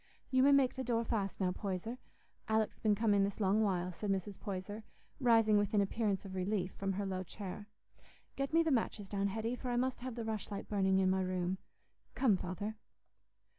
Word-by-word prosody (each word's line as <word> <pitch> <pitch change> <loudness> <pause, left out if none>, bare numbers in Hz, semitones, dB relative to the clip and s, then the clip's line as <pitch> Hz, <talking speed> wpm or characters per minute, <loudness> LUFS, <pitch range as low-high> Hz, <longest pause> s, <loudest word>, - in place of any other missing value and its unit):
"You 260 -1 +4
may 280 +2 +6
make 275 -2 +5
the 260 - -4
door 235 -2 +1
fast 200 -4 -1
now, 185 -2 +2
Poyser; 200 +6 -4 0.5
Alick's 220 0 +1
been 215 -2 +3
come 220 0 +2
in 200 -1 +4
this 200 +1 -2
long 205 +1 +3
while," 180 -4 +1
said 205 +4 -4
Mrs. 195 0 -2
Poyser, 205 +2 -5 0.4
rising 225 -4 +5
with 205 +1 0
an 205 - +5
appearance 200 -1 0
of 190 - -7
relief 185 0 -1
from 195 0 -2
her 200 +1 -2
low 190 -1 -2
chair. 200 +2 -7 0.7
"Get 275 0 -2
me 330 +1 +5
the 325 - +1
matches 220 -5 0
down, 200 -1 0
Hetty, 225 +4 -2
for 250 - -5
I 245 - 0
must 255 0 0
have 255 -2 -5
the 230 -2 -4
rushlight 215 -2 -4
burning 190 -2 +2
i' 190 - +3
my 190 0 +2
room. 185 0 -1 0.6
Come, 235 -7 +4
Father." 195 +4 -4
205 Hz, 205 wpm, -35 LUFS, 190-225 Hz, 0.7 s, may